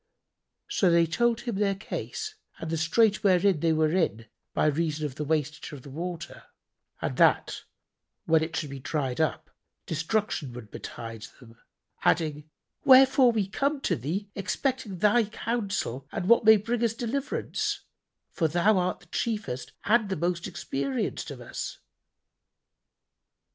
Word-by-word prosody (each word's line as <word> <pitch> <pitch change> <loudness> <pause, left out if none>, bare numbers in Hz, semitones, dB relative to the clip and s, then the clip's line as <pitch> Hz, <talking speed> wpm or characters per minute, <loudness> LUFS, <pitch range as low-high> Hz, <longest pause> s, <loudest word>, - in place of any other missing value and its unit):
So 310 - +2
they 170 0 +5
told 235 +8 +1
him 235 -6 -3
their 200 -1 +1
case 430 - -5 0.2
and 165 - -5
the 165 - 0
strait 210 +7 +3
wherein 190 -3 +4
they 165 +1 +2
were 155 - +1 0.3
by - - +1
reason 155 0 0
of 145 - -4
the 150 - -4
wastage 150 0 -2
of 135 -3 -9
the 140 - -11
water, 170 +2 -6 0.6
and - - -1
that, - - +3 0.6
when 160 -1 +4
it 160 +1 -3
should 150 -3 -3
be 140 - -6
dried 135 0 -2
up, 155 0 -1 0.3
destruction 160 - -1
would 120 -4 -10
betide 115 -1 -7
them, 115 -3 -16 0.4
adding, 155 -2 +1 0.3
"Wherefore 265 -1 +7
we 215 -4 0
come 280 +8 0
to - - +1
thee, 170 - -3
expecting 220 0 -2
thy 215 +5 +4
counsel 200 - -3
and 180 - -3
what 235 0 +5
may 220 0 +9
bring 230 +3 -2
us 225 -1 +1
deliverance, 260 +5 -2 0.5
for 160 - +1
thou 175 +6 +3
art 180 0 -1
the - - -18
chiefest 210 - -3
and 220 -1 +3
the 190 - 0
most 170 +2 -1
experienced 140 -7 -3
of - - -8
us." - - -5
175 Hz, 150 wpm, -27 LUFS, 150-215 Hz, 0.6 s, may